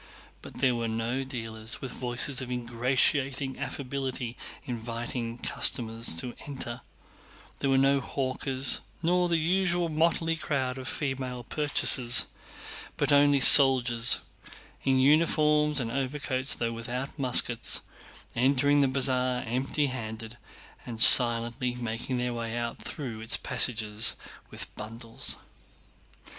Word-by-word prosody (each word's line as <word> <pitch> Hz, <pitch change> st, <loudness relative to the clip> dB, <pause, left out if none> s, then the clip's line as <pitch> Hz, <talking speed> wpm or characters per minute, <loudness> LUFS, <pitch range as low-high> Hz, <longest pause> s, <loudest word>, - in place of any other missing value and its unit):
But -, -, -13 dB
there 130 Hz, -1 st, 0 dB
were 115 Hz, -1 st, -3 dB
no 115 Hz, +4 st, -3 dB
dealers 115 Hz, -4 st, -6 dB
with 135 Hz, -, -8 dB
voices 125 Hz, +2 st, 0 dB
of 130 Hz, -, -8 dB
ingratiating 130 Hz, +3 st, -1 dB
affability 135 Hz, -3 st, -6 dB, 0.3 s
inviting 115 Hz, -1 st, -6 dB
customers 115 Hz, -4 st, 0 dB
to 120 Hz, +9 st, -3 dB
enter; 125 Hz, -3 st, -7 dB, 0.8 s
there 140 Hz, -, -2 dB
were 135 Hz, -, +2 dB
no 135 Hz, +1 st, +2 dB
hawkers, 130 Hz, 0 st, -1 dB, 0.2 s
nor 180 Hz, +1 st, 0 dB
the 170 Hz, -, +1 dB
usual 175 Hz, +1 st, -1 dB
motley 165 Hz, +1 st, -1 dB
crowd 135 Hz, -4 st, -4 dB
of 130 Hz, -, -9 dB
female 130 Hz, -3 st, -5 dB
purchasers—but 140 Hz, +1 st, -1 dB
only 145 Hz, 0 st, +3 dB
soldiers, 125 Hz, -4 st, +7 dB, 0.6 s
in 135 Hz, -1 st, +1 dB
uniforms 150 Hz, +1 st, +2 dB
and 115 Hz, -3 st, -4 dB
overcoats 135 Hz, 0 st, -1 dB
though 115 Hz, -1 st, -3 dB
without 125 Hz, +5 st, -7 dB
muskets, 125 Hz, -2 st, +1 dB, 0.5 s
entering 140 Hz, +3 st, +1 dB
the 140 Hz, -, +2 dB
Bazaar 130 Hz, -1 st, -1 dB
empty 130 Hz, +5 st, -2 dB
handed 115 Hz, -3 st, -7 dB, 0.5 s
and 115 Hz, -2 st, -8 dB
silently 120 Hz, +1 st, +7 dB
making 120 Hz, +1 st, -5 dB
their 125 Hz, 0 st, -3 dB
way 115 Hz, 0 st, -6 dB
out 120 Hz, 0 st, -6 dB
through 120 Hz, -7 st, -8 dB
its 115 Hz, +1 st, +2 dB
passages 110 Hz, -2 st, 0 dB, 0.3 s
with -, -, -9 dB
bundles. 115 Hz, +2 st, -5 dB
130 Hz, 115 wpm, -26 LUFS, 120-140 Hz, 0.8 s, soldiers